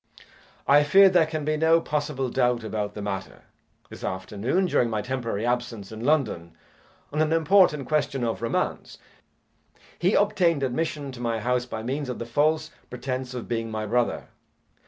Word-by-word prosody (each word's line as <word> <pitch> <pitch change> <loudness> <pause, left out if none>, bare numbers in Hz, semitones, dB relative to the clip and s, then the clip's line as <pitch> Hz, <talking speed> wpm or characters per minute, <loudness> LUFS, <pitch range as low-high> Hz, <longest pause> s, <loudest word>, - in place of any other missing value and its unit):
I 145 +2 +6
fear 195 +7 +7
there 175 -4 +3
can 155 -2 -4
be 155 0 0
no 160 +1 +4
possible 145 -5 -2
doubt 125 -2 +1
about 105 -2 -3
the 105 - -5
matter. 100 -2 -5 0.5
This - - -10
afternoon 105 - -1
during 125 -9 +2
my 110 -2 -2
temporary 115 -3 -3
absence 120 -4 -2
in 110 +1 -7
London 110 - 0 0.6
on 150 - +1
an 155 0 +1
important 165 -3 +4
question 145 -4 0
of 115 -1 -2
romance, 115 - -2 1.0
he 185 +4 +2
obtained 180 -8 +2
admission 145 +1 -2
to 125 - -11
my 115 -2 -1
house 125 +2 0
by 110 -2 -5
means 135 +3 -3
of 125 - -4
the 115 - -5
false 155 +6 +1 0.2
pretence 130 0 -4
of 120 - -6
being 115 -1 -2
my 110 -1 -3
brother. 120 +3 -1
130 Hz, 165 wpm, -25 LUFS, 115-155 Hz, 1.0 s, fear